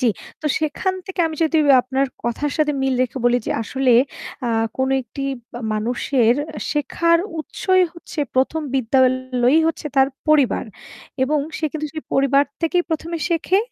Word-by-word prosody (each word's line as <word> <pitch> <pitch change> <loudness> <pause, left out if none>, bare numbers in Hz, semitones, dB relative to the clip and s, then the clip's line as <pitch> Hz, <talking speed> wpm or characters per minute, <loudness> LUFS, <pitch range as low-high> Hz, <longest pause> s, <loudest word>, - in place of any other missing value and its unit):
জ্বি। 255 - +2 0.4
তো - - -1
সেখান 315 +5 -1
থেকে 380 -2 -3
আমি 320 -1 -5
যদি 320 +1 +1 0.3
আপনার 265 +1 0 0.2
কথার 260 +5 -2
সাথে 300 -1 +2
মিল 265 -1 +1
রেখে 255 +1 -3
বলি 245 0 +4
যে - - -1
আসলে 260 +3 0 0.6
আ - - 0 0.3
কোনো 265 0 +1
একটি 245 +3 -10 0.5
মানুষের 235 +2 +1 0.4
শেখার 335 +3 +2 0.2
উৎসই 370 +4 +1
হচ্ছে 340 -1 -12 0.2
প্রথম 265 +5 +1
বিদ্যালয়ই 255 +2 +2
হচ্ছে 325 -1 -2
তার 270 0 +5 0.2
পরিবার। 290 -5 +3 0.6
এবং 300 +3 +2 0.2
সে - - -3
কিন্তু 310 -1 -3
সেই 310 - -6
পরিবার 275 +1 +4 0.2
থেকেই 350 +2 +2
প্রথমে 325 +1 -2
শেখে। 345 +2 +2
275 Hz, 150 wpm, -21 LUFS, 255-320 Hz, 0.6 s, তার